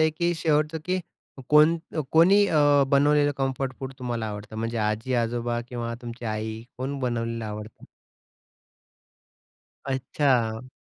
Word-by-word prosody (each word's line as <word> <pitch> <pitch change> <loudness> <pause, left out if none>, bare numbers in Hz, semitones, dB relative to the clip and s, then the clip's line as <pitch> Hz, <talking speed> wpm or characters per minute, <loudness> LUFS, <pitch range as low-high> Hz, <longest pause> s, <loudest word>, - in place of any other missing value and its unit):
आहे, 155 0 +4
की 170 +2 0
शेवटचं 155 0 +1
की 185 0 0 0.5
कोण 150 +2 +6 0.2
अ, - - +1
कोणी 190 +6 +6
अ, 155 - +3 0.3
बनवलेलं 145 +1 +4
कम्फर्ट 135 -1 -1
फूड 135 0 -5
तुम्हाला 120 -3 -3
आवडतं? 105 +1 -7
म्हणजे 115 +1 -2
आजी-आजोबा 120 +2 -1
किंवा 120 -1 -4
तुमची 120 0 -8
आई, 110 +1 -3 0.2
कोण 135 +2 -3
बनवलेलं 115 -2 -2
आवडतं? 105 0 -8 2.0
अच्छा. 130 -3 0
125 Hz, 120 wpm, -25 LUFS, 115-150 Hz, 2.0 s, कोण